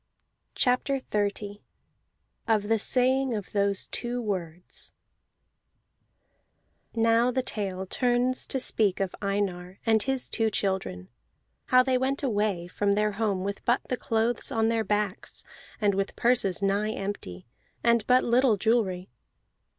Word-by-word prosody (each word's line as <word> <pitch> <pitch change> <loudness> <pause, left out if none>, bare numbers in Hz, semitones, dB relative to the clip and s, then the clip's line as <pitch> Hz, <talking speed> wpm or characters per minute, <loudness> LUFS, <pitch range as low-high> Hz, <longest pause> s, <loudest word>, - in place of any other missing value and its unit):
CHAPTER 260 +2 +2
XXX 205 -3 -2 0.9
OF 215 -2 +1
THE 225 -1 +3
SAYING 260 +2 +1
OF 205 -3 -6
THOSE 200 -1 0
TWO 245 0 -2
WORDS 180 -6 -4 2.0
Now 230 +1 +3
the 255 +1 0
tale 190 -5 -3
turns 245 +4 +1
to 265 - -1
speak 210 -6 +2
of 195 -2 -1
Einar 195 -2 -2
and 220 -2 +4
his 265 +1 -1
two 225 -1 +1
children: 190 - -2 0.6
how 255 0 +5
they 255 -1 +1
went 270 +2 -1
away 205 -8 0
from 200 +2 0
their 210 0 +1
home 200 -3 -1
with 200 +1 -4
but 240 +2 +2
the 250 - +1
clothes 230 0 -1
on 225 0 +2
their 225 -1 +1
backs, 210 -1 -2 0.4
and 205 -2 +2
with 195 +1 -2
purses 220 -5 +1
nigh 205 +2 +1
empty, 195 - -5 0.4
and 235 -2 +4
but 255 0 +5
little 240 -2 +3
jewelry. 190 - 0
215 Hz, 135 wpm, -27 LUFS, 195-240 Hz, 2.0 s, how